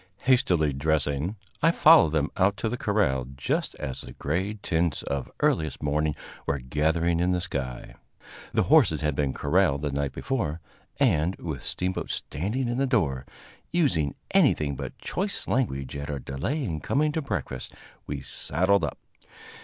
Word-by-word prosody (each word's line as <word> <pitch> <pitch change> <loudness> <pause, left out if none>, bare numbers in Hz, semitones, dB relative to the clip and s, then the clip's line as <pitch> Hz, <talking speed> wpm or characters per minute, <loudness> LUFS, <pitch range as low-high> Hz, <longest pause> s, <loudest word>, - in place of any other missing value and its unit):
Hastily 90 - +3
dressing, 75 +4 0 0.3
I 165 - +5
followed 160 - +7
them 75 0 +1
out 100 0 +2
to 110 - -1
the 125 - -2
corral 100 - +1
just 65 - -1
as 65 - -5
the - - -10
gray 95 +8 -2
tints 85 -4 0
of 70 -2 -3
earliest 80 -4 +1
morning 75 0 +1 0.3
were 70 - +1
gathering 80 +6 +1
in 90 +1 +2
the 90 - +1
sky. 65 -8 -4 0.6
The - - +2
horses 80 -1 +4
had 75 -1 +1
been 70 -2 +1
corralled 75 0 +2
the 75 - -1
night 70 0 -1
before, 85 - -2 0.4
and, 95 - +3
with 75 -7 -5
Steamboat 90 +1 -3
standing 105 - -2
in 120 +2 -1
the 135 - +2
door, 75 - 0 0.4
using 85 - +1 0.2
anything 70 -2 +3
but - - -6
choice 200 +2 -3
language 70 - -1
at 70 0 -5
our 75 - -2
delay 70 - -3
in 85 -10 -2
coming 150 - +1
to 160 - -1
breakfast, 135 - -4 0.3
we - - -4
saddled 95 +3 +1
up. - - -2
80 Hz, 160 wpm, -27 LUFS, 70-105 Hz, 0.6 s, followed